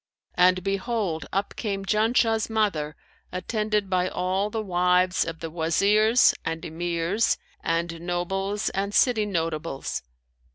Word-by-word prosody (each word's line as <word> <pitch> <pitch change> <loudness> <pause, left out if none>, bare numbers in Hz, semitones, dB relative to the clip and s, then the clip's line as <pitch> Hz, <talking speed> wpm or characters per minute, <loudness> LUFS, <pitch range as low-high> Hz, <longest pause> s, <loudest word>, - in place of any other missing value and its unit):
And 180 0 +4
behold, 195 -3 -2
up 195 +1 -2
came 195 -3 -3
Janshah's 225 +1 +2
mother, 195 -10 0 0.4
attended 210 +2 -1
by 185 -1 +1
all 185 +3 -1
the 220 - -3
wives 180 -1 +2
of 165 -1 -6
the 165 -1 -5
Wazirs 205 +8 +4
and 165 +1 -3
Emirs 170 +5 0 0.3
and 165 0 -1
nobles 195 +4 -2
and 200 +1 -2
city 225 -5 +3
notables. 165 -5 -3
185 Hz, 120 wpm, -25 LUFS, 170-210 Hz, 0.4 s, And